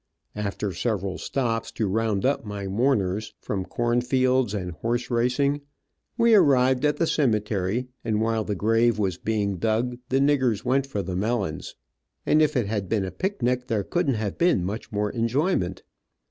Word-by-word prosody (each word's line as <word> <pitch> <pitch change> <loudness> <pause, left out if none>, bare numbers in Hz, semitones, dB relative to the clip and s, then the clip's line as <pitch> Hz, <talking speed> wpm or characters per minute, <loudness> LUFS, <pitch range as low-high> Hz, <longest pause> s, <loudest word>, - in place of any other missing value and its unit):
After 105 -1 -3
several 100 0 -2
stops, 115 -4 -2
to 110 - -1
round 105 0 0
up 140 +2 +1
my 105 -2 -5
mourners, 105 -2 0
from 95 -3 -3
corn 120 +3 0
fields 130 -3 +1
and 90 -3 -3
horse 120 +9 -2
racing, 125 +5 +1 0.6
we 230 -1 +4
arrived 130 -7 +4
at 150 - +2
the 165 - +2
cemetery, 110 - 0 0.2
and 110 -1 0
while 110 0 +1
the 105 -1 -3
grave 115 +3 +2
was 95 -4 -1
being 105 -3 -1
dug 115 +6 0
the 135 - +2
niggers 130 -6 +2
went 135 +2 +1
for 105 -8 -3
the 90 0 -4
melons, 100 -5 -2 0.5
and 155 - +4
if 150 -2 +2
it 120 - +1
had 100 -2 -3
been 105 -4 +1
a 95 - -5
picnic 125 -11 -1
there 105 -3 0
couldn't 150 - 0
have 105 -2 -3
been 170 - +3
much 105 +4 -5
more 105 -1 -1
enjoyment. 115 - 0
115 Hz, 170 wpm, -25 LUFS, 100-130 Hz, 0.6 s, we